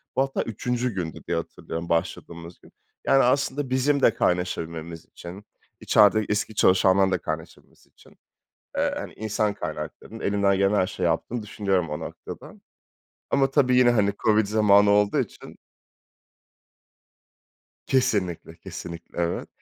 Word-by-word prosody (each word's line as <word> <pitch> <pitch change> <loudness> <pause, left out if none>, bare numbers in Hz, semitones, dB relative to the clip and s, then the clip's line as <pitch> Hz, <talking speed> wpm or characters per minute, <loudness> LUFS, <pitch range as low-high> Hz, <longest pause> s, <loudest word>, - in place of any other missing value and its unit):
Bu - - +3
hatta 135 0 -1
3'üncü 125 +1 -2
gündü 85 -4 -4
diye 85 - 0
hatırlıyorum, 85 0 -6
başladığımız 85 +1 -3
gün. - - -19 0.4
Yani, 135 - +5
aslında 135 +1 +1
bizim 135 +2 +1
de 115 - +5
kaynaşabilmemiz 85 -3 -2
için, 95 +4 -11 0.3
içerideki 105 0 +4
eski 105 +1 -1
çalışanların 95 0 +4
da - - +2
kaynaşabilmesi 80 +1 -8
için, - - -22 0.6
eee, - - +1
hani, - - -7
insan 105 -1 -1
kaynaklarının 110 +2 -7
elinden 100 -2 +1
gelen 100 +2 +2
her 95 - +2
şeyi - - -3
yaptığını 120 -2 -1
düşünüyorum 95 -5 -1
o 75 - -4
noktada - - -9 0.8
ama 135 -1 +2
tabii 130 -3 +3
yine, 125 -1 +6
hani, 105 -4 +2
COVID 110 -1 +4
zamanı 105 -1 +4
olduğu 105 0 +3
için - - -7 2.3
Kesinlikle, 100 -11 0
kesinlikle. 85 0 -9
Evet. 85 - -2
100 Hz, 130 wpm, -25 LUFS, 90-120 Hz, 2.3 s, yine